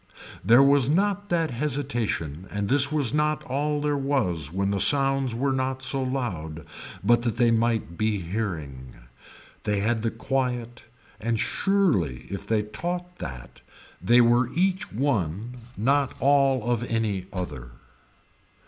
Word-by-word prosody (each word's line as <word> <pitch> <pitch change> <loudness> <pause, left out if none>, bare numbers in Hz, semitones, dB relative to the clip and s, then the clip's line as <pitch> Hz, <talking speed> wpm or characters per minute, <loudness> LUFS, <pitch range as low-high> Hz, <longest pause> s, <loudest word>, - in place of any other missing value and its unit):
There 120 +4 +6
was 140 -2 +4
not 200 +4 +1
that 165 -4 +1
hesitation 120 - -2
and 100 -1 -3
this 145 +1 +4
was 145 -6 0
not 150 0 +1
all 145 +3 -1
there 145 0 0
was 110 - -1
when 100 +2 -1
the 100 - 0
sounds 135 -1 +3
were 135 +3 0
not 130 0 -2
so 135 +1 0
loud 90 - -4 0.4
but 120 0 +4
that 120 -2 -1
they 120 -2 +4
might 115 -6 0
be 110 -1 +1
hearing. 80 - -5 0.7
They 105 -1 0
had 110 +1 0
the 115 - 0
quiet 120 0 -3 0.3
and 115 +1 -1
surely 105 - +1
if 100 0 -6
they 110 -1 +1
taught 175 +10 -5
that 60 -2 -8 0.4
they 120 +7 +5
were 120 +1 +3
each 185 +2 0
one 115 - -1 0.2
not 140 +4 +1
all 135 -3 +3
of 120 -2 +1
any 105 -5 -1
other. 75 - -5
120 Hz, 140 wpm, -25 LUFS, 100-140 Hz, 0.7 s, There